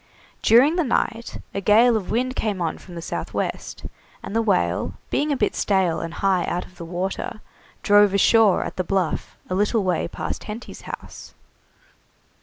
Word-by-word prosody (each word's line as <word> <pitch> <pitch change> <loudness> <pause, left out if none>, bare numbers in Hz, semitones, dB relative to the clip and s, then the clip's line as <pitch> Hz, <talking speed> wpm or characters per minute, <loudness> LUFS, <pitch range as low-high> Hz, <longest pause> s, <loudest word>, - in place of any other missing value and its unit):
During 265 +9 +5
the 345 - +3
night 235 -3 -1
a 200 - -2
gale 225 +4 +5
of 210 -4 -2
wind 255 +3 0
came 210 -4 -1
on 170 -2 -2
from 180 - -12
the 170 - -6
south - - -5
west, - - -4 0.4
and 205 - -6
the 230 - +3
whale, 90 - 0 0.2
being 295 +1 +1
a 280 - +1
bit 210 - 0
stale 190 -5 +1
and 165 0 -5
high 190 -2 +2
out 175 - -2
of 180 - -19
the 170 - -6
water, 185 +5 -4 0.4
drove 205 -1 +6
ashore 205 +1 +4
at - - -7
the 185 - 0
Bluff, 185 -2 -2
a - - -3
little 205 +3 +1
way 180 -3 0
past - - -5
Henty's 220 +3 -8
house. - - -9
200 Hz, 180 wpm, -23 LUFS, 180-225 Hz, 0.4 s, drove